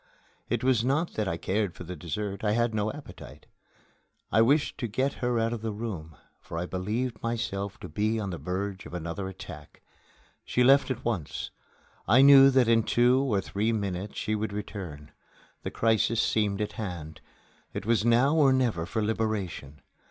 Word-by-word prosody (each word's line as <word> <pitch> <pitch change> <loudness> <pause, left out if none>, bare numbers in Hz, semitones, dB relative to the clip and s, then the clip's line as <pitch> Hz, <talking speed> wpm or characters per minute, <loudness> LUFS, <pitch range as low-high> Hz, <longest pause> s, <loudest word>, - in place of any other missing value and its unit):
It - - -1
was 125 -3 +3
not 145 +7 0
that 105 -2 -1
I 85 - -1
cared 100 0 -1
for - - -8
the 90 +1 -7
dessert; 95 +6 -4
I 105 -1 +2
had 120 0 +1
no 105 0 0
appetite. 150 +3 -11 0.9
I 110 - +5
wished 140 +6 +2
to 120 - -2
get 130 +6 0
her 125 -1 +1
out 115 +1 +1
of 115 - -5
the 115 - -2
room, 100 -8 -6 0.2
for 85 - -8
I 85 - -2
believed 105 +6 -3
myself 100 -4 -3
to - - -6
be 105 +7 0
on 100 -3 -3
the 85 - -5
verge 95 +1 -4
of - - -8
another 85 +3 -4
attack. 95 -1 -10 0.6
She 125 - +1
left 135 +3 +5
at 130 - -4
once. 100 -11 -3 0.6
I 130 +4 +6
knew 135 -1 +9
that 130 -3 +4
in 115 0 +5
two 125 +4 +3
or 110 -8 +1
three 105 +4 -1
minutes 100 -2 -3
she 110 - -1
would 110 -1 -2
return. 90 -8 -7 0.5
The - - -4
crisis 115 0 +1
seemed 105 -2 +1
at 105 - -2
hand. 80 -6 -6 0.5
It - - -5
was 115 -2 +2
now 120 +6 +4
or 145 -4 +5
never 120 -11 +1
for 110 +2 -1
liberation. 100 -10 -3
110 Hz, 180 wpm, -28 LUFS, 95-120 Hz, 0.9 s, knew